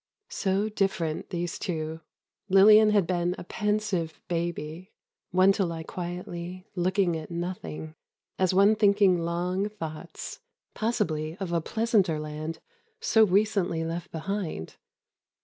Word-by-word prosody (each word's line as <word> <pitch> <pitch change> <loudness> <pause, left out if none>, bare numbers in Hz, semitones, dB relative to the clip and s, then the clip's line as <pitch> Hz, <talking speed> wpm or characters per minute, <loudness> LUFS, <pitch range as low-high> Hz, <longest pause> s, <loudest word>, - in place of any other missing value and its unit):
So 195 +1 0
different, 195 -7 -1
these 175 -2 -3
two. 160 -2 -3 0.5
Lillian 210 +3 +8
had 205 -4 +3
been 175 +1 0
a - - -7
pensive 210 -6 -1
baby—one 175 +2 -1
to 195 0 +1
lie 165 -2 -3
quietly, 175 +1 -6
looking 185 -1 +1
at 160 -1 -6
nothing, 170 -3 -5 0.5
as 185 -1 +3
one 200 +3 +5
thinking 200 -3 +4
long 180 +4 -1
thoughts—possibly 170 - -4
of 190 -3 -3
a 170 - +2
pleasanter 215 -5 +1
land, 155 +1 -5 0.4
so 230 - +4
recently 195 -4 +2
left 170 +1 -4
behind. 165 - -4
180 Hz, 115 wpm, -27 LUFS, 165-200 Hz, 0.5 s, Lillian